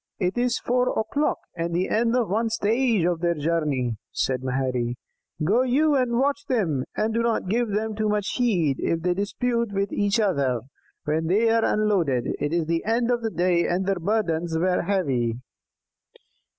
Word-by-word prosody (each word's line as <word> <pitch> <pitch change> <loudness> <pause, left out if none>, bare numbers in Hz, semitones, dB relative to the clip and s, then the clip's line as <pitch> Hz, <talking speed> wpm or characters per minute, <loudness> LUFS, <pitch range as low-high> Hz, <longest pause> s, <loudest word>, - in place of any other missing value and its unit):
"It 180 -2 -1
is 245 0 +1
four 250 +1 0
o'clock, 280 +7 0 0.2
and 170 0 -2
the 185 +2 +1
end 230 +2 +1
of 245 -4 +1
one 225 +4 0
stage 225 -2 +1
of 175 -2 0
their 170 0 +1
journey," 145 -7 -1
said 130 -1 -1
Maherry. 130 -2 -1 0.5
"Go 210 +10 +3
you 285 +5 +2
and 250 -3 +1
watch 280 +2 +1
them; 170 - 0
and 220 +1 0
do 230 - +1
not 230 -5 0
give 235 +5 +1
too 215 +1 -1
much 210 -1 0
heed 180 - +1
if 165 - -1
they 180 0 +2
dispute 235 +4 -1
with 200 0 -1
each 205 +2 +1
other 140 - +1 0.4
when 160 +2 0
they 220 +6 +3
are 230 0 +3
unloaded. 180 - +1
It 145 - -1
is 170 -1 0
the 165 +1 -1
end 235 +2 +1
of 240 -1 0
the 225 - -1
day, 175 -3 +1
and 180 +2 0
their 195 -1 0
burdens 170 -4 0
were 180 +2 +1
heavy." 135 - 0
195 Hz, 175 wpm, -24 LUFS, 165-230 Hz, 0.5 s, Go